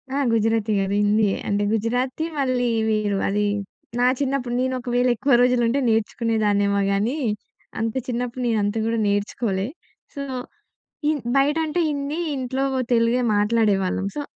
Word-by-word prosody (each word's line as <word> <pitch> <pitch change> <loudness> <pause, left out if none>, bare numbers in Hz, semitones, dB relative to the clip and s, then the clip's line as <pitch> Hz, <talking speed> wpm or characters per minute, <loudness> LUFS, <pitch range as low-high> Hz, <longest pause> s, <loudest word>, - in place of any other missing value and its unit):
ఆ! - - 0 0.2
గుజరాతీ 225 -1 +1
కాదు. 195 0 -1
హిందీయే. 205 -1 +2
అంటే 205 0 +1
గుజరాతీ 245 +7 -1
మళ్ళీ 255 -2 +1 0.2
వీరు 210 -2 +1
అది 205 +1 +1 0.5
నా 245 - +4
చిన్నప్పుడు, 265 -3 -1
నేను 260 0 0
ఒకవేళ 245 0 0
ఎక్కువ 270 +4 +1
రోజులు 250 0 +3
ఉంటే 255 +5 +1
నేర్చుకునేదాన్నేమో 210 -2 +1
గానీ, 215 +8 0 0.6
అంత 225 0 -1
చిన్నప్పుడు 245 0 -3
నేను 225 -2 +1
అంత 205 +2 -1
గూడా 230 0 0
నేర్చుకోలే. 200 0 -1 0.5
సో, 280 - -5 0.8
హిన్ 300 -2 +1 0.2
బయట 285 +3 +3
అంటే 315 +3 -2
హిందీ, 285 +2 -3 0.2
ఇంట్లో 260 +1 -2
వో 260 - 0
తెలుగే 230 +1 +3
మాట్లాడేవాళ్ళం. 205 -3 +1
సో, 295 - -2
230 Hz, 140 wpm, -23 LUFS, 210-255 Hz, 0.8 s, నా